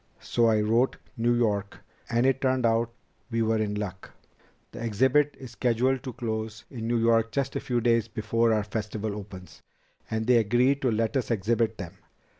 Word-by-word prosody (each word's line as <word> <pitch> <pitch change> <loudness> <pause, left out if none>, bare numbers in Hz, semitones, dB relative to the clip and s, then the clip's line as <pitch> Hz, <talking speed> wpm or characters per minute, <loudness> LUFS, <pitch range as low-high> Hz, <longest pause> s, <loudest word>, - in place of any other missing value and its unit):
So 120 -1 +1
I 110 -1 +3
wrote 115 +5 +2 0.2
New 120 0 +2
York, 105 -4 0 0.3
and 120 +1 +2
it 135 0 +2
turned 130 -2 +1
out 115 +1 +2 0.4
we 115 -1 0
were 110 0 +1
in 105 -1 -1
luck. 95 -2 -5 0.6
The - - -9
exhibit 130 +6 +2
is 130 -3 -9
scheduled 125 +2 +1
to 130 - -6
close 110 -3 -4
in 115 -3 -5
New 120 0 +1
York 115 0 +3
just 135 +1 -2
a - - 0
few 120 -2 -1
days 115 -1 +2
before 115 +1 0
our 110 -1 +2
Festival 110 0 -4
opens. 95 -3 -10 0.5
And 110 0 -2
they 125 0 +5
agreed 120 +5 +2
to 130 - +2
let 115 +3 0
us 130 - 0
exhibit 115 +1 0
them. 90 -4 -8
115 Hz, 185 wpm, -27 LUFS, 110-120 Hz, 0.6 s, they